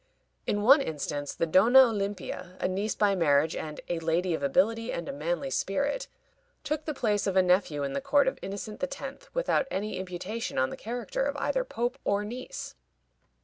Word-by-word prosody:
In 205 0 0
one 275 +6 +7
instance, 145 - -3
the - - +1
Donna 220 +10 +7
Olimpia, 200 -5 -3
a - - +1
niece 200 +3 -1
by 205 -1 +3
marriage, 160 -3 +3
and 155 -1 -5
"a 175 -1 -1
lady 165 +2 0
of 160 - -2
ability 225 - +2
and 170 - -4
a - - -4
manly 155 0 -2
spirit," 280 - -1 0.6
took 305 +1 -2
the 305 - -2
place 210 -5 +1
of 195 - 0
a 190 - +6
nephew 180 -5 +2
in 140 -1 -2
the - - -2
court 280 0 +3
of 265 - -1
Innocent 200 +2 -6
X., 275 - -5
without - - +1
any 210 +3 -3
imputation 185 +5 -4
on 130 0 +2
the - - -5
character 245 - -4
of - - -3
either - - 0
pope 245 - -3
or 200 +1 +1
niece. 245 +4 -6
200 Hz, 190 wpm, -28 LUFS, 170-245 Hz, 0.6 s, one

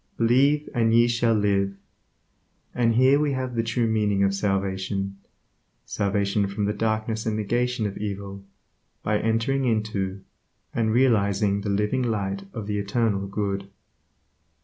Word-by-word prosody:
Believe 140 +6 +3
and 115 -1 +2
ye 120 0 +5
shall 115 -1 +2
live. 100 -2 +1 1.0
And 115 -2 +2
here 130 +3 +5
we 150 -2 +1
have 130 -1 -3
the 115 - +1
true 115 +1 0
meaning 105 -3 +1
of 100 0 +2
salvation; 95 0 -2 0.7
salvation 100 0 0
from 100 +1 -2
the 105 - 0
darkness 110 +1 -1
and 110 - 0
negation 120 +2 0
of 100 - -4
evil, 100 -1 -5 0.6
by 105 0 +1
entering 115 +5 0
into, 105 -4 -1 0.5
and 110 -2 +1
realizing 100 -5 +2
the 100 - -3
living 105 +6 0
light 100 -4 -2
of 110 - -6
the 105 0 -2
Eternal 100 -1 0
Good. 100 -1 -3
105 Hz, 140 wpm, -25 LUFS, 100-115 Hz, 1.0 s, ye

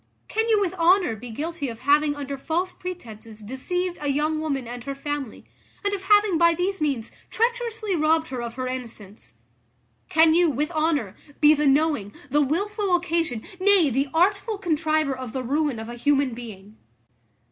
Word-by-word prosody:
Can 445 +1 -1
you 435 -2 +4
with 380 -3 0
honour 350 - +4
be 240 +3 -9
guilty 295 +4 -4
of 230 0 -9
having 290 +2 +3
under 280 -1 -5
false 330 +7 -2
pretences 225 -12 -9
deceived 345 - -3
a 290 - -2
young 300 +3 0
woman 280 -6 -2
and 245 0 -7
her 275 - -4
family, 285 -3 -5 0.4
and 405 - +1
of 385 -1 -4
having 410 -4 +4
by 335 -1 +5
these 365 +1 -2
means 270 -7 -1 0.2
treacherously 455 -3 -1
robbed 320 0 +2
her 255 -2 -4
of 235 -1 -6
her 255 0 -3
innocence? 220 - -7 0.7
Can 320 0 +5
you, 345 0 +4
with 300 +4 -1
honour, 305 - 0 0.2
be 300 0 +7
the 300 -1 +1
knowing, 275 -8 +1 0.2
the 295 +2 +4
wilful 395 - 0
occasion, 330 -9 -1 0.2
nay, 375 -6 +4
the 275 +3 0
artful 400 +6 +1
contriver 310 -5 0
of 255 -3 -7
the 260 - -3
ruin 285 0 0
of 220 0 -6
a 240 - -7
human 275 +1 +1
being? 215 -3 -10
300 Hz, 175 wpm, -24 LUFS, 255-355 Hz, 0.7 s, be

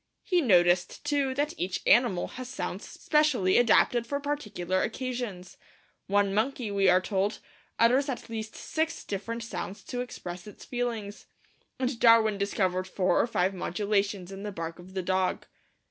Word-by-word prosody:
He 360 -3 +2
noticed, 180 - +3
too, 285 -3 0
that 295 +3 0
each 180 0 -1
animal 235 -8 +4
has 255 0 -8
sounds 260 - -5
specially 285 - +2
adapted 240 0 +4
for 280 +2 -1
particular 210 -11 -2
occasions. 240 -7 -4 0.5
One 200 0 +2
monkey, 225 +1 -1
we 195 -1 +3
are 180 +1 +6
told, 195 +1 -1 0.4
utters 255 +5 +4
at 260 - -4
least 220 -1 -6
six 320 0 -2
different 230 +4 -4
sounds 205 -3 -6
to 245 +4 -4
express 180 -7 -7
its 210 - -12
feelings; 230 -4 -4 0.5
and 255 -2 -2
Darwin 225 -3 +5
discovered 185 -2 0
four 185 0 +2
or - - 0
five 190 -4 +1
modulations 200 0 -1
in 195 0 -7
the 205 0 -4
bark 165 -2 -6
of 185 +2 -13
the 190 - -1
dog. 185 0 0
210 Hz, 155 wpm, -28 LUFS, 185-245 Hz, 0.5 s, are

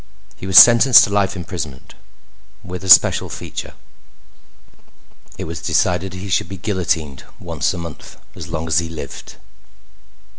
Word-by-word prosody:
He 80 +8 -10
was 95 -1 +2
sentenced 120 0 +8
to 100 - -2
life 100 -1 0
imprisonment, 80 -7 -8 0.7
with 90 +1 -9
a 95 - -6
special 85 - +5
feature. - - -8 1.6
It - - -6
was 80 0 -8
decided 90 +1 -1
he 95 +2 -8
should 90 -1 -1
be 95 - -8
guillotined 90 -8 -3 0.2
once - - -3
a - - -7
month 85 -3 -10 0.2
as 80 - -9
long 80 -1 -5
as 80 0 +2
he 85 -1 -5
lived. 80 -2 -10
90 Hz, 145 wpm, -18 LUFS, 80-95 Hz, 1.6 s, sentenced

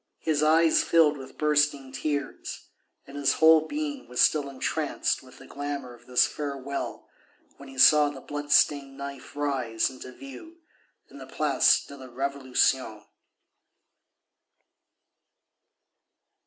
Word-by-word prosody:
His 155 -2 -1
eyes 160 +1 +4
filled 160 -3 +3
with 135 -2 -11
bursting 150 -3 +1
tears, 145 0 -5 0.4
and 140 - -13
his 145 -1 +1
whole 160 0 +5
being 290 -2 -5
was 125 - -6
still 145 -3 +3
entranced 135 -1 -2
with - - -17
the - - -14
glamour 140 -3 -6
of 120 0 -19
this 125 -1 +4
farewell 140 -1 -5 0.5
when 140 -1 -12
he 135 - -13
saw 150 +2 +6
the 145 -2 -9
blood 145 +2 -7
stained 140 -2 +3
knife 140 -1 -9
rise 130 -6 -1
into 130 0 -11
view 325 - -12 0.5
in - - -12
the - - -10
Place - - +2
de 140 - -11
la 130 -1 -11
Révolution. 130 -4 -1
140 Hz, 130 wpm, -26 LUFS, 130-150 Hz, 0.5 s, saw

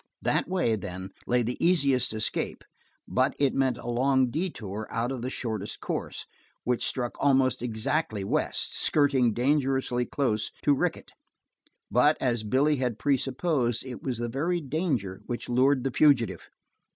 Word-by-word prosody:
That - - +1
way, 180 -12 +1
then, 95 -1 -7 0.2
lay 120 0 +2
the 120 +2 -3
easiest 140 -8 +3
escape, 110 -1 -2 0.4
but 130 +1 +1
it 140 -2 +2
meant 130 -3 +1
a 120 - -9
long 130 +1 +2
detour 110 - -4
out 120 +3 -1
of 130 -3 -4
the 125 - -3
shortest 110 -6 -4
course, - - -4 0.4
which 125 -1 0
struck 120 -2 -2
almost 135 -3 +3
exactly 110 -1 -1
west, 95 - 0
skirting 140 -5 +3
dangerously 130 0 +1
close 110 -7 0
to 145 - +4
Rickett. 135 - -2 0.8
But, 125 +8 +4
as 120 -4 0
Billy 140 +7 +2
had 125 -4 -1
presupposed, 135 -2 0
it 125 -2 -7
was 130 -4 -3
the 120 0 -2
very 160 +9 -1
danger 135 - -2
which 120 - -4
lured 130 +2 +3
the 135 - -1
fugitive. 135 -5 +2
125 Hz, 150 wpm, -27 LUFS, 115-140 Hz, 0.8 s, to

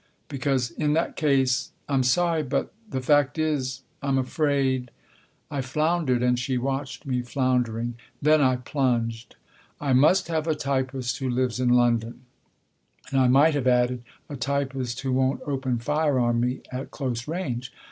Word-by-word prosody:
Because 135 -3 -1
in 150 -1 0
that 165 +2 0
case 130 -4 +2 0.2
I'm 135 -2 +2
sorry 165 +6 +2
but 140 -3 -2 0.2
the 130 - -3
fact 145 +2 +3
is, 135 -5 -1 0.2
I'm 140 -1 +1
afraid 130 -2 0 0.3
" - - -37
I 140 - -1
floundered, 150 -1 0
and 125 0 +2
she 125 +1 -1
watched 135 +2 -3
me 125 -2 -1
floundering. 120 -2 0 0.3
Then 155 +1 +4
I 130 -2 +4
plunged. 120 -3 -1 0.2
" - - -32
I - - +4
must 155 +9 +4
have 160 -1 -1
a 160 - +1
typist 130 -3 -2
who 135 -1 -2
lives 125 -1 0
in 125 -1 +2
London." 120 -1 +2 0.9
(And 135 - +2
I 130 - +4
might 140 +5 +5
have 140 -3 0
added 125 0 +2 0.2
" - - -38
a 145 - -6
typist 135 -2 -2
who 135 -1 -2
won't 130 +1 +1
open 135 -3 -1
fire 150 +3 +1
on 120 -1 +2
me 125 +2 -1
at 130 +1 -5
close 125 -4 -4
range.") 130 -7 -3
130 Hz, 165 wpm, -25 LUFS, 125-145 Hz, 0.9 s, might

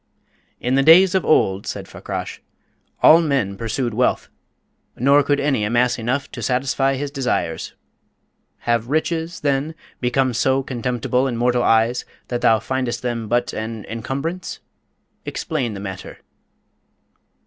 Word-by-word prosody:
"In 125 - -1
the 135 - +4
days 175 +6 +7
of 190 - +2
old," 95 -9 +2
said - - -5
Fakrash, - - -6 0.6
"all 165 +2 +8
men 135 -11 0
pursued 115 +3 -2
wealth; 125 +3 0 0.7
nor 140 +4 +4
could 145 0 +1
any 135 -6 +1
amass 120 +3 +1
enough 130 +5 -1
to - - -7
satisfy 135 +1 +1
his 140 +1 -4
desires. 125 - -2 0.9
Have 120 0 0
riches, 160 +2 -1
then, 145 +2 0 0.2
become 130 +1 +1
so 130 +3 +1
contemptible 125 +1 -1
in 120 -3 -3
mortal 125 +1 +2
eyes 115 +1 +2 0.3
that 120 -1 -2
thou 110 - +5
findest 125 0 -3
them 115 -2 -2
but 120 +2 0
an 110 -1 -5
encumbrance? 140 +10 -4 0.6
Explain 130 -9 -3
the - - -6
matter." 95 -2 -7
125 Hz, 135 wpm, -21 LUFS, 115-140 Hz, 0.9 s, all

